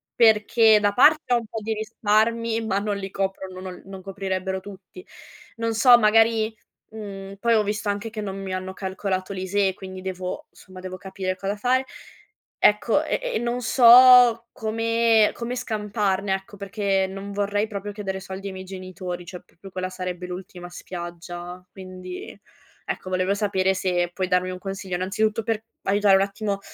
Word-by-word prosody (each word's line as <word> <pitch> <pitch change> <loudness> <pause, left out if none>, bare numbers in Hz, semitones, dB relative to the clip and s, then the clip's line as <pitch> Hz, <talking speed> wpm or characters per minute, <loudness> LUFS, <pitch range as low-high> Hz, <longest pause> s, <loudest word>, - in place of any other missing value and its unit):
Perché 220 -1 +5
da 205 -1 +1
parte 300 +2 +5
ho 240 - +5
un 230 - -5
po' 220 +1 -6
di 220 +1 -2
risparmi, 220 +1 0
ma 195 - 0
non 205 0 -2
li 195 -1 -5
coprono, 190 -1 -4
non 185 -1 -8
non 190 -1 -9
coprirebbero 190 -1 -3
tutti. 200 - -12 0.5
Non 230 0 -1
so, 240 +2 +7
magari, 220 0 +3 0.4
mhmm, 195 -2 -8
poi 235 +1 +3
ho 215 - +3
visto 210 0 -2
anche 205 +2 -2
che 215 -1 -5
non 195 -2 -5
mi 190 -1 -5
hanno 185 0 -4
calcolato 190 0 -3
l'ISEE, 190 +1 0
quindi 185 -1 -9
devo 185 -1 -5
somma, 185 0 -14
devo 185 0 -7
capire 190 -1 -4
cosa 195 +2 -3
fare. 255 +4 +1 0.7
Ecco, - - +3
e - - -1 0.2
e - - +1
non 240 +1 -2
so 245 -1 +7
come 225 0 +2
come 240 +1 -4
scamparne, 205 -4 -1
ecco, 195 +3 -9
perché 195 -1 0
non 195 +1 -7
vorrei 205 +1 0
proprio 205 -1 -5
chiedere 195 -2 -4
soldi 190 +1 -8
ai 195 - -5
miei 190 0 -8
genitori, 185 -1 -7
cioè, 180 0 -9
proprio 195 +3 -15
quella 185 0 -3
sarebbe 180 -1 -5
l'ultima 180 -1 -8
spiaggia, 175 0 -8
quindi, 185 0 -9 0.5
ecco, 185 - -4
volevo 185 +1 +1
sapere 190 -2 +1
se 180 -2 0
puoi 185 0 -2
darmi 180 0 +1
un 180 - -7
consiglio, 195 -1 -5
innanzitutto, 210 +4 0
per 225 -1 -2 0.2
aiutare 200 0 +4
un - - +2
attimo 200 0 -3
195 Hz, 170 wpm, -24 LUFS, 185-220 Hz, 0.7 s, so